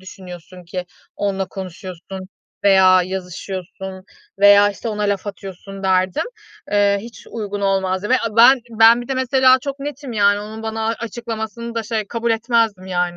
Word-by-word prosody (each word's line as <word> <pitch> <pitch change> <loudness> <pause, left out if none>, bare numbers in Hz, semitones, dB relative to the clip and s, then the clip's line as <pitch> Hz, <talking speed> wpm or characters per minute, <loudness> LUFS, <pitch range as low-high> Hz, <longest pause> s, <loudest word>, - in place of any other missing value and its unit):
düşünüyorsun 180 -1 -11
ki 180 +1 -5 0.3
onunla 195 -2 -1
konuşuyorsun 185 0 -8 0.4
veya 185 -2 +6
yazışıyorsun 190 +1 -6 0.3
veya, 205 0 +7
işte, 205 - -6
ona 210 -1 -3
laf 200 -1 -1
atıyorsun 195 0 -8
derdim, 185 -1 +1 0.5
ııı, 200 -1 +3
hiç 230 +3 -11
uygun 205 -3 -5
olmazdı 190 0 0
ve 255 - +4
a 225 -1 -4
ben 250 +3 +7
ben 225 +1 +6
bir 240 - -12
de 270 - -1
mesela 260 0 +4
çok 275 +1 -5
netim 280 -2 -6
yani. 205 -1 +3
Onun 220 +1 -8
bana 220 0 -3
açıklamasını 230 0 -5
da, 230 - -1
şey, 220 -1 -3
kabul 235 0 -2
etmezdim, 225 -4 +1
yani. 175 -1 -1
205 Hz, 155 wpm, -20 LUFS, 190-230 Hz, 0.5 s, veya